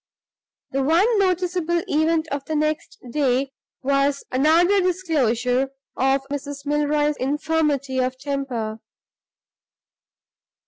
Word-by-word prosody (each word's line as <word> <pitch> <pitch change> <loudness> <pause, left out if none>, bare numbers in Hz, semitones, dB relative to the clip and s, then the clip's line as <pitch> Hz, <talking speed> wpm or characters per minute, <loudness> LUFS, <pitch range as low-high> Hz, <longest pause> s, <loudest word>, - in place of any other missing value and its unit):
The 275 - 0
one 370 - +3
noticeable 360 -2 +1
event 315 +1 +1
of 280 0 -3
the 315 - -3
next 305 +1 -1
day 270 -1 +1 0.3
was 275 +1 +1
another 330 +9 +4
disclosure 270 -9 +1 0.3
of 270 +1 +2
Mrs. 285 0 -5
Milroy's 295 0 +1
infirmity 285 -1 0
of 255 0 -1
temper. 260 -6 -3
290 Hz, 95 wpm, -23 LUFS, 270-320 Hz, 0.3 s, another